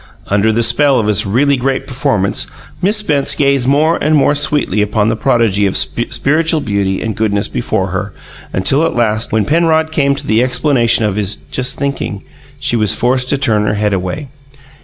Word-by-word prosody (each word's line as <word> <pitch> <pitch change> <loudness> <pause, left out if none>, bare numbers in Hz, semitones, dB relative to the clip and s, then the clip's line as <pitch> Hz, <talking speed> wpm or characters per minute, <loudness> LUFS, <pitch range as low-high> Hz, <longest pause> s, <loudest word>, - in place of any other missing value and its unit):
Under 105 +2 +2
the 115 +2 0
spell 140 +3 +3
of 110 - -1
his 105 -2 +1
really 140 +8 +2
great 135 +1 -2
performance, 130 -7 -1 0.3
Miss 205 +4 +2
Spence 150 -10 +1
gazed 140 -3 +1
more 155 +4 +2
and 155 +1 +1
more 145 0 +3
sweetly 145 -8 +1
upon 105 +1 0
the 115 - 0
prodigy 110 -5 +1
of 95 - +1
spiritual 150 +7 0
beauty 100 -6 -2
and 110 -2 -3
goodness 105 -1 0
before - - -2
her, - - -4 0.4
until 135 +11 +1
at 165 - -1
last, 110 -2 0
when 110 -2 +1
Penrod 160 +1 +1
came 140 -3 +1
to - - -6
the 110 +1 +2
explanation 125 -3 +2
of 105 -1 -2
his 105 -1 0
"just 125 -1 -3
thinking," 140 -8 -4 0.4
she 135 -2 0
was 110 -4 +2
forced 125 +1 0
to 140 - +2
turn 110 -6 +1
her 105 - 0
head 105 0 0
away. 95 +11 -3
125 Hz, 185 wpm, -14 LUFS, 105-140 Hz, 0.4 s, spell